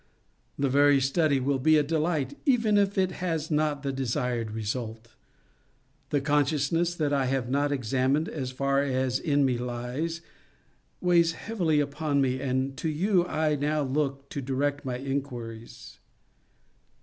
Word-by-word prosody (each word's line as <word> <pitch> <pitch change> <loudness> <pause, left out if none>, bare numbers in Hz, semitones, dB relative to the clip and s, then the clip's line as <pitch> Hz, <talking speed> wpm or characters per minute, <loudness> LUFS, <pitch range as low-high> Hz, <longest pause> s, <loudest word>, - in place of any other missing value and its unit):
The 140 - +1
very 140 +1 +5
study 140 +1 +2
will 135 +1 0
be 155 +4 +4
a 150 - +3
delight, 155 -3 -1
even 230 -6 +3
if 200 -1 +2
it 185 -1 +2
has 165 -3 -3
not 150 -2 0
the 140 - -1
desired 125 -3 -1
result. 110 +1 -4 1.0
The 145 - +1
consciousness 150 +4 +1
that 150 -3 0
I 135 -2 +2
have 130 -1 -1
not 145 +1 +1
examined 135 +4 +1
as 135 -5 -4
far 140 +1 +1
as 130 -2 0
in 145 -2 +2
me 125 -2 0
lies, 125 +7 -3 0.8
weighs 170 -2 +4
heavily 170 -7 0
upon 145 0 0
me, 130 -1 +1
and 130 0 -1
to 160 - -2
you 180 +3 +1
I 155 -2 +1
now 150 +1 0
look 140 0 -2
to 140 - -4
direct 140 +2 -1
my 125 -2 -3
inquiries. 120 -4 -6
140 Hz, 150 wpm, -27 LUFS, 130-155 Hz, 1.0 s, very